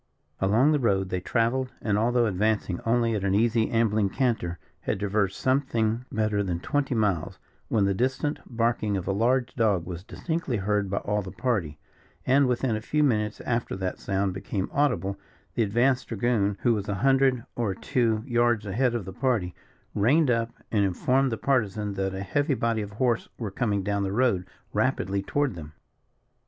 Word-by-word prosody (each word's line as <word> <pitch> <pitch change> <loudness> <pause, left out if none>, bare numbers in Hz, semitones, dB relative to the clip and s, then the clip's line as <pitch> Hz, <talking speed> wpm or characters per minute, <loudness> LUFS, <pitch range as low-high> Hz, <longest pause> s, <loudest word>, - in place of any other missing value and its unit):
Along 110 +10 +4
the 150 - +2
road 95 -6 +1
they 90 - -1
travelled, 120 +6 0
and 105 -2 0
although 120 +3 +2
advancing 105 -2 0
only 115 0 +2
at 105 -3 -2
an 100 -1 +1
easy 115 +1 +2
ambling 110 -3 +2
canter, 110 -9 -1 0.2
had - - -2
traversed 100 -1 0
something 125 -3 +1
better 110 -1 0
than 90 -4 -2
twenty 135 +6 -1
miles, 100 -7 0 0.3
when 105 -3 +2
the 100 - +2
distant 130 +7 -1
barking 115 -3 0
of 90 - -5
a - - +1
large 120 +5 +1
dog 105 -8 +1
was 90 -1 -6
distinctly 160 - -3
heard 105 0 0
by 100 - -1
all 105 0 -1
the 95 - -7
party, 95 - -2 0.5
and 135 +1 +4
within 125 -1 0
a 110 - -3
few 150 +6 +1
minutes 105 -6 0
after 115 -1 -2
that 95 -1 -3
sound 95 -1 -1
became 95 0 -3
audible, 125 -9 0 0.3
the - - 0
advanced 120 +5 +2
dragoon, 105 -3 0
who 120 - +4
was 105 -1 -3
a 100 - 0
hundred 135 -3 +3
or 110 -6 -1
two 115 -4 0
yards 120 -3 +2
ahead 120 +5 +1
of 115 -6 -3
the 95 - -7
party, 115 -7 0 0.4
reined 130 +7 +3
up 115 -1 +1 0.2
and 105 -3 +2
informed 130 +8 +1
the 115 - -2
Partisan 105 -6 0
that 95 0 -2
a 95 - -4
heavy 145 - 0
body 115 -2 0
of 100 -1 -6
horse 120 +1 0
were 110 -5 -4
coming 100 -2 0
down 100 0 0
the 95 -1 -1
road 105 -5 +1 0.3
rapidly 100 +1 0
toward 145 +6 0
them. 75 -3 -9
110 Hz, 180 wpm, -26 LUFS, 100-125 Hz, 0.5 s, Along